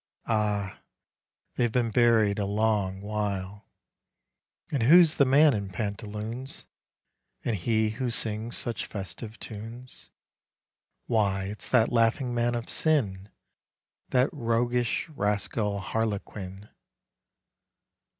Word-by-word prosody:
Ah! 105 -3 -1 0.8
they 120 - +3
've - - -7
been 120 -1 +1
buried 110 -3 +4
a 100 - 0
long 100 -2 0
while! 100 -1 -3 1.0
And 140 - 0
who's 160 +6 +7
the 140 - +5
man 140 +3 +6
in 100 -3 -3
pantaloons, 105 +5 -4 0.8
And 115 - +1
he 110 +3 +1
who 125 +2 -2
sings 110 0 -1
such 115 -4 -3
festive 105 +3 -7
tunes? 115 +4 -7 1.0
Why 100 -4 +1
it's 100 +2 -5
that 120 -3 +3
laughing 120 +2 +2
man 120 0 +1
of 120 -1 -4
sin, 105 -11 0 0.8
That 130 +2 +2
roguish 120 -1 0
rascal 105 -4 -1
Harlequin 100 -2 -4
110 Hz, 105 wpm, -27 LUFS, 105-120 Hz, 1.0 s, who's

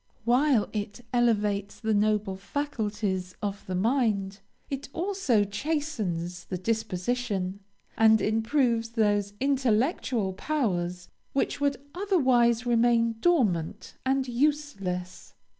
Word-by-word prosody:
While 250 -1 +3
it 210 +2 -4
elevates 210 -4 +1
the 220 -1 0
noble 210 -1 +1
faculties 205 -5 -3
of 205 0 -4
the 185 - -2
mind, 205 -2 +1 0.3
it 275 0 -5
also 345 - +1
chastens 205 - -3
the 185 - -4
disposition, 200 -1 -2 0.4
and 220 0 +6
improves 225 +2 +1
those 205 -3 +1
intellectual 255 - +1
powers 180 - -2 0.3
which 275 +1 -1
would 285 -1 +1 0.2
otherwise 255 - +2
remain 230 -1 +3
dormant 210 - +1
and 265 0 +1
useless. 235 -10 -2
225 Hz, 100 wpm, -27 LUFS, 200-265 Hz, 0.4 s, and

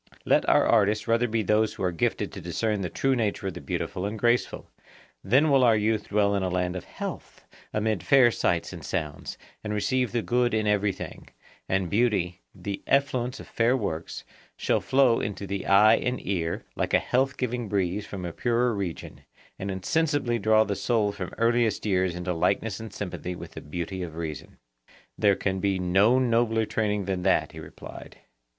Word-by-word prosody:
Let - - +3
our - - +5
artists 105 -1 +2
rather 115 +1 +2
be 110 -1 0
those 105 +2 +2
who - - -5
are 90 - +1
gifted 85 - -1
to - - -8
discern 105 +4 -1
the 90 - -2
true 135 +8 +1
nature 105 -4 -1
of 95 - -2
the - - -8
beautiful 90 +5 -3
and 105 +2 -5
graceful; 120 +3 0 0.6
then 135 +9 +3
will 135 -2 +5
our 115 -3 +5
youth 105 0 0
dwell 100 0 +2
in 100 - 0
a 95 - -1
land 90 0 -1
of 90 - -6
health, - - -7 0.3
amid 105 -2 0
fair 130 -4 +5
sights 85 -4 -1
and 85 - -9
sounds, 75 -6 -4 0.3
and 105 0 -3
receive 125 +3 0
the 120 -2 -1
good 120 -1 +1
in 110 -1 0
everything; 105 -1 -2 0.4
and 95 -1 +1
beauty, 100 -5 +1
the 100 -1 -5
effluence 130 -2 +1
of - - -9
fair 120 +3 +2
works, 85 -8 -4 0.3
shall - - +1
flow 130 -3 +3
into 100 -1 -4
the 100 0 -4
eye 105 +3 +6
and 125 0 -2
ear, 85 -3 -2
like - - 0
a - - +7
health 130 +2 0
giving 120 -3 -2
breeze 100 0 0
from 95 -3 -7
a 85 - -5
purer 120 0 +1
region, 95 -5 -5 0.4
and 95 - -4
insensibly 120 - 0
draw 110 +1 +4
the 100 -2 -2
soul 110 -1 +1
from 95 -3 -6
earliest 115 -2 +1
years 95 -3 +1
into 90 0 -2
likeness 95 +4 0
and 110 -2 -8
sympathy 90 -2 -5
with - - -9
the - - -9
beauty 90 +5 -5
of 85 -3 -6
reason. 80 -3 -6 0.6
There 100 -2 +3
can 95 0 -2
be 100 0 +1
no 95 +7 +3
nobler 115 -3 +2
training 105 -2 -1
than 95 -1 -2
that, - - +2
he - - -10
replied. - - -11
105 Hz, 190 wpm, -26 LUFS, 95-115 Hz, 0.6 s, a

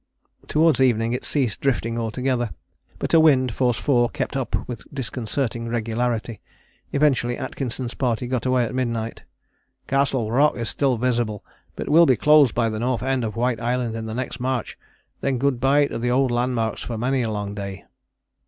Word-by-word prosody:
" - - -51
Towards 155 -4 +3
evening 115 -2 +2
it 125 - -3
ceased 130 -8 0
drifting 115 -4 0
altogether, 120 +1 -1 0.5
but - - -3
a 165 - +7
wind, 130 -6 +4
force 125 -2 +1
4, 120 -4 +2
kept - - -4
up 135 -2 -2
with 120 - -6
disconcerting 120 -2 -3
regularity. 115 0 -2 0.5
Eventually 135 -4 +2
Atkinson's 125 -2 -4
party 125 -2 -1
got 125 0 -2
away 130 -1 +2
at - - -5
midnight. 115 -3 -3 0.6
"Castle 135 -5 0
Rock 145 +5 +3
is 115 -1 -2
still 135 -4 +1
visible, 120 -3 -1 0.3
but - - -5
will 165 +3 +6
be 130 - +5
closed 145 0 +5
by 120 -1 +2
the 110 -1 -3
north 125 0 -1
end 130 -1 0
of 110 -1 -3
White 120 -1 0
Island 120 -1 -1
in 110 0 -5
the 110 - -5
next 125 -1 -4
march 130 -1 -2 0.4
then 135 -2 0
good 135 -1 0
bye 140 +3 +4
to 140 - -4
the 120 +1 -1
old 130 +1 +2
landmarks 120 -2 -1
for 115 - -4
many 130 +3 0
a 115 - -1
long 105 -1 -3
day." 100 -2 -6
125 Hz, 180 wpm, -23 LUFS, 115-130 Hz, 0.6 s, a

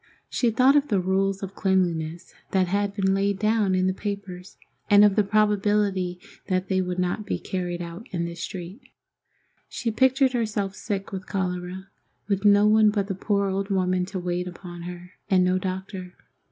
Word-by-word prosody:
She 240 - +1
thought 255 +5 +4
of 290 0 +3
the 205 -7 +1
rules 195 +1 0
of 195 0 -5
cleanliness 175 -4 -1 0.2
that 190 -1 +2
had 200 +2 -1
been 190 -2 +2
laid 200 0 +1
down 215 -2 +2
in 185 0 +2
the 185 - +1
papers, 195 -2 -6 0.3
and 205 0 +8
of 205 -2 +3
the 210 - +4
probability 205 -3 +1 0.3
that 185 0 -1
they 190 -1 +2
would 180 -1 -3
not 180 +4 -1
be 205 - -2
carried 175 -2 -4
out 170 +8 -9
in 170 -2 -2
this 170 0 -6
street. 185 +6 -7 0.9
She 230 - -2
pictured 260 +3 +3
herself 210 -5 -1
sick 200 -2 -4
with 190 0 -6
cholera, 185 0 -3 0.4
with 200 0 -1
no 205 0 +6
one 215 0 +5
but 205 -1 -1
the - - 0
poor 200 +1 0
old 195 +1 -2
woman 185 -2 +1
to 190 +1 -6
wait 180 0 -2
upon 175 -1 -9
her, 180 0 -10 0.2
and 185 -2 +4
no 185 +1 +2
doctor. 185 0 -5
195 Hz, 180 wpm, -25 LUFS, 180-205 Hz, 0.9 s, and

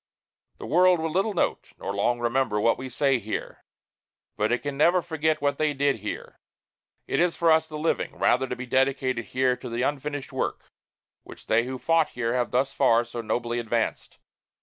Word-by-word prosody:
The - - -8
world 180 +2 +4
will 160 0 -2
little 195 +5 0
note, - - -1
nor 100 - -4
long 110 +4 +1
remember, 120 -2 0
what 115 +2 +2
we 130 0 -6
say 130 +1 +1
here, 110 0 -6 0.7
but 105 +1 0
it 120 - 0
can 145 -1 -3
never 170 +5 +3
forget 155 -2 -1
what 140 0 0
they 155 -2 +1
did 140 -2 +1
here. 105 0 -7 0.7
It - - 0
is 175 0 +2
for 165 -1 +3
us, 160 0 +3
the 155 - -7
living, 160 +2 -1
rather, 130 +2 +2
to 125 - -3
be 130 - -6
dedicated 130 -2 0
here 130 +2 +1
to - - -8
the 120 +1 -2
unfinished 145 0 -3
work - - -2 0.6
which - - -14
they 115 +2 +2
who 130 +1 -4
fought 165 +3 +2
here 115 -1 0
have 125 -1 0
thus 130 +2 0
far 115 +1 +3
so 120 0 -6
nobly 120 +2 -2
advanced. 115 0 -2
130 Hz, 195 wpm, -26 LUFS, 120-155 Hz, 0.7 s, world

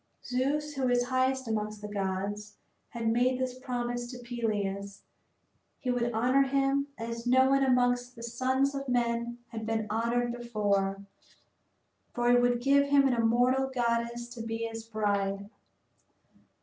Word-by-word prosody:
Zeus, 285 +4 -1
who 265 -3 0
is 245 0 +3
highest 260 0 +1
amongst 215 -1 -2
the 210 - -6
gods, 205 +1 -3 0.3
had 230 -1 -4
made 245 +3 +2
this 255 -1 -3
promise 245 -1 -3
to 250 - -7
Peleus 205 -5 -3 0.7
he 255 - -2
would 240 -1 0
honor 250 +4 +3
him 275 +1 +1
as 230 +1 -5
no 260 +2 +5
one 275 0 +4
amongst 245 -1 +2
the 230 - -10
sons 260 +4 0
of 275 -1 -4
men 235 -1 0
had 225 -2 -6
been 220 0 -1
honored 235 +2 0
before, 205 -5 -1 1.1
for 240 0 +2
he - - +6
would 245 0 +2
give 280 +1 +4
him 280 -1 +5
an 260 - +2
immortal 245 +3 +2
goddess 235 -1 -1
to 240 -1 -8
be 225 0 -3
his 225 0 -7
bride. 200 -3 -1
240 Hz, 150 wpm, -29 LUFS, 225-255 Hz, 1.1 s, he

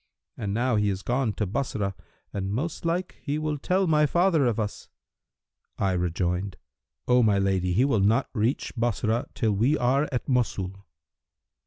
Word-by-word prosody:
And 100 -2 -3
now 120 +2 +1
he 105 -1 +2
is 95 0 -3
gone 120 -3 0
to 105 - -1
Bassorah 100 -2 -2 0.4
and 95 -1 -3
most 155 +10 -3
like 175 +2 -1
he 145 0 -2
will 155 -1 -2
tell 185 +6 +1
my 150 -3 +3
father 170 -4 +3
of 115 -2 0
us.' 105 -1 -4 0.9
I 95 - +1
rejoined, 90 +2 -1 0.5
'O 125 0 +5
my 105 -3 +3
lady 95 -2 +1
he 120 +8 +3
will 135 -7 +2
not 110 +7 +3
reach 115 +3 -1
Bassorah, 120 +1 0
till 110 -3 +1
we 120 +10 +2
are 135 +4 +2
at 125 - -2
Mosul.' 100 -6 -1
115 Hz, 165 wpm, -26 LUFS, 100-140 Hz, 0.9 s, O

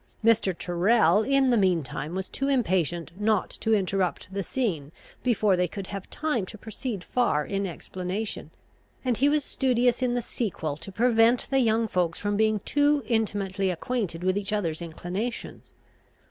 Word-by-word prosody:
Mr. 215 -6 +3
Tyrrel, 180 +2 +3
in 270 +2 +3
the 240 - +4
mean 185 -5 +3
time, 150 +6 -5
was 190 0 -3
too 275 - -3
impatient 180 - 0
not 215 -2 +1
to 220 0 +1
interrupt 190 -1 -1
the 200 - -1
scene 180 - -2 0.3
before 215 -5 +3
they 180 0 +1
could 195 +3 -6
have 195 0 -7
time 300 -9 -1
to 215 - -9
proceed 220 -1 -5
far 175 -13 +1
in 195 0 -2
explanation; 185 +4 -5 0.6
and 245 -3 +1
he 280 +2 +4
was 300 0 +2
studious 250 -2 +1
in 245 -1 +1
the 245 - 0
sequel 170 - -3
to 175 +6 -9
prevent 230 +2 +3
the 270 - +4
young 225 -2 +2
folks 175 -5 0
from 205 0 -1
being 215 -1 +2
too 290 +2 +2
intimately 200 -4 0
acquainted 180 -2 -2
with 185 +2 +2
each 200 -1 -5
other's 175 -6 -1
inclinations. 180 +8 -5
205 Hz, 165 wpm, -26 LUFS, 185-240 Hz, 0.6 s, the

